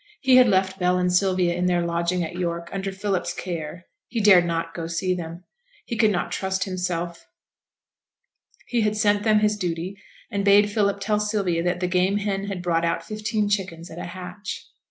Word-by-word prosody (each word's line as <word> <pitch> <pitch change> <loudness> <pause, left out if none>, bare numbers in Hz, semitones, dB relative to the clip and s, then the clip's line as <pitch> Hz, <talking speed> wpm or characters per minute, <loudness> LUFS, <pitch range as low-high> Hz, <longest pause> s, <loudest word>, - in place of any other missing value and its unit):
He 260 -2 +5
had 250 -1 +7
left 190 -1 +1
Bell 180 0 +2
and 180 0 +1
Sylvia 185 -1 +2
in 180 +1 0
their 175 -1 +1
lodging 170 +1 0
at 160 - -5
York, 170 -1 -3
under 195 0 -3
Philip's 190 -1 -2
care; 170 0 -5 0.2
he 235 - -3
dared 195 -4 +6
not 165 0 -2
go 165 -1 -4
to - - -9
see 185 +2 0
them; 170 0 -6 0.4
he 235 - -4
could 220 -1 +4
not 180 -4 -1
trust 190 0 -1
himself; 180 -2 -3 1.4
he 240 -2 0
had 210 0 +1
sent 205 -1 +3
them 215 0 +3
his 210 0 +2
duty, 180 -1 -3 0.4
and 200 -2 -1
bade 205 +1 +5
Philip 200 -1 +1
tell 210 +1 +1
Sylvia 205 -5 0
that 180 +1 -1
the 180 - +1
game 185 +2 +2
hen 200 -1 -2
had 195 -3 -5
brought 170 -1 +1
out 170 0 0
fifteen 215 +1 -1
chickens 190 -5 -2
at 165 - -8
a - - -5
hatch. 185 +4 -7
185 Hz, 195 wpm, -24 LUFS, 175-205 Hz, 1.4 s, had